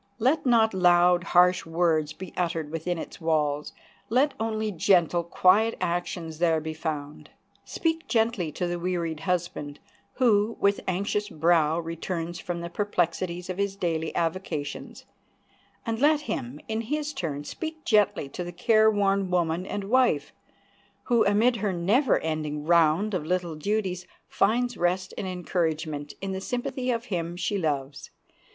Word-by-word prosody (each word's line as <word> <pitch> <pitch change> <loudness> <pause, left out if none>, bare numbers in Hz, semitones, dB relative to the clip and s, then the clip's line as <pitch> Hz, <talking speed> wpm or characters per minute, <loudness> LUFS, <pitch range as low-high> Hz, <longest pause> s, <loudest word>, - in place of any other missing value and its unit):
Let 265 +5 +1
not 225 -3 +4
loud, 175 -1 +4
harsh 180 0 +4
words 165 -2 +1
be 185 +1 -9
uttered 165 -4 -2
within 165 +2 -2
its 165 - -8
walls. 150 -2 0 0.4
Let 265 +5 +3
only 220 -1 -1
gentle, 175 -1 +3
quiet 195 +6 +3
actions 170 -2 -3
there 165 -2 +3
be 160 0 -5
found. 150 -2 -5 0.4
Speak 325 -1 -2
gently 225 -8 +1
to 180 - -2
the 175 0 -2
wearied 170 -3 -2
husband, 170 -4 -3 0.3
who, 225 -3 +2
with 200 0 +2
anxious 200 +3 -1
brow, 160 -2 +2
returns 165 +1 -4
from 175 -2 -4
the 170 - -5
perplexities 180 -2 -1
of 185 +1 -5
his 200 -1 0
daily 165 -4 -2
avocations; 165 -4 -3 0.8
and 225 -1 -2
let 300 +2 +4
him, 130 - -4
in 220 0 -1
his 300 +5 -3
turn, 150 - -4
speak 315 - -6
gently 205 - +2
to 180 - -5
the 175 - -6
care 215 +5 +4
worn 200 -2 +1
woman 175 0 0
and 205 - -3
wife, 220 - +2 0.7
who, 235 -2 +3
amid 225 +4 +3
her 205 -1 -1
never 205 +9 +2
ending 155 -2 -3
round 170 +5 +3
of 180 -5 -1
little 175 0 -1
duties, 185 +1 -2 0.2
finds 245 +4 +1
rest 185 +2 0
and 190 - -4
encouragement 160 -5 -2
in 195 0 -3
the 190 0 -4
sympathy 250 +2 -3
of 235 -1 -1
him 175 -4 -3
she 195 +2 -1
loves. 140 -4 -3
180 Hz, 150 wpm, -26 LUFS, 165-210 Hz, 0.8 s, not